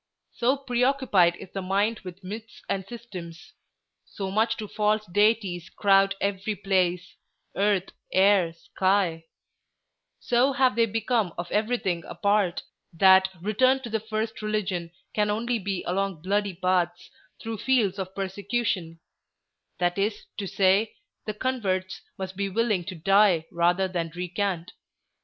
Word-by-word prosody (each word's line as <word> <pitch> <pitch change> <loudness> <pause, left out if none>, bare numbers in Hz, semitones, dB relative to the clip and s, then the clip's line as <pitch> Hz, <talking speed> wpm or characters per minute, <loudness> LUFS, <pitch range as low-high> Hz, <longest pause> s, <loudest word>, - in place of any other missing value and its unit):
So 255 +4 +1
preoccupied 250 -9 +2
is 180 - -11
the 195 - -4
mind 200 +4 0
with 185 0 -10
myths 215 +4 -8
and 195 - -1
systems; 180 -9 -9 0.5
so 195 -2 -6
much 225 +3 +1
do 215 - -5
false 210 +1 0
deities 200 -3 +1
crowd 195 -1 +3
every 200 +1 -1
place—earth, 190 +1 -1 0.2
air, 190 -3 +4
sky; 175 0 0 0.9
so 245 +3 +2
have 260 -4 +3
they 230 -1 +3
become 220 -3 0
of 175 0 -5
everything 210 -6 0
a - - -8
part, 200 -3 +1 0.3
that 190 +2 +6
return 255 +6 +3
to 235 - -6
the 220 - 0
first 220 +1 -4
religion 200 -5 -2 0.2
can 210 -1 +1
only 230 +3 0
be 195 -2 -3
along 190 -3 -2
bloody 200 0 0
paths, 180 -1 0 0.3
through 225 -2 -5
fields 215 -7 +1
of 190 0 -5
persecution; 195 -3 -2 0.8
that 175 +1 0
is 205 +1 -1
to 200 - -3
say, 195 +4 +2 0.3
the 215 - -1
converts 200 -7 -2 0.2
must 190 0 -5
be 200 +1 -2
willing 215 -2 +1
to 185 - -6
die 190 0 +4
rather 175 +3 +2
than 170 -3 -3
recant. 180 -1 -2
195 Hz, 135 wpm, -26 LUFS, 185-215 Hz, 0.9 s, that